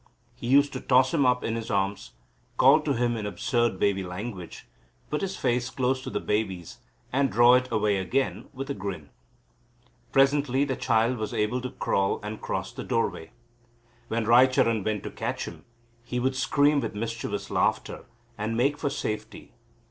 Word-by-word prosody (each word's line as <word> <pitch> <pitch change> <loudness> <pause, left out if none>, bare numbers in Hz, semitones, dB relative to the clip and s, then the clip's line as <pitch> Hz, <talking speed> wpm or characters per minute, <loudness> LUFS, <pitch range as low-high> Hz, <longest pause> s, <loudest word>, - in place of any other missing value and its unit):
He - - -8
used 140 +2 +4
to - - -5
toss 130 0 +3
him 140 -5 +3
up 125 0 +2
in 115 - -1
his 115 -1 -5
arms, 100 -1 -1 0.4
call 155 - +7
to 150 -2 0
him 120 -1 0
in 105 -2 -3
absurd 115 +2 0
baby 100 -1 +2
language, 90 0 -7 0.5
put 150 - -1
his 195 -1 -3
face 120 +1 0
close 130 0 0
to - - -6
the - - -2
baby's 95 -5 -3 0.3
and 135 +1 +2
draw 120 +2 +6
it 130 0 +2
away 105 -2 +2
again 95 +8 -1
with 135 0 -6
a - - 0
grin. 95 - -6 1.0
Presently 135 0 +3
the 135 -2 -2
child 115 +1 +1
was 110 +2 -3
able 110 +3 0
to 130 - -4
crawl 95 -4 0
and 105 +1 -6
cross - - -3
the - - -6
doorway. 80 - -1 0.8
When 115 0 -1
Raicharan 120 -2 +4
went 105 -1 -2
to - - -6
catch - - -3
him, - - -10 0.4
he 125 +1 -3
would 130 +2 0
scream 145 +3 +3
with 135 - -4
mischievous 115 +2 -4
laughter - - 0 0.3
and 110 +2 -2
make 140 +4 +1
for 145 - 0
safety. 110 -4 -5
120 Hz, 175 wpm, -26 LUFS, 105-130 Hz, 1.0 s, call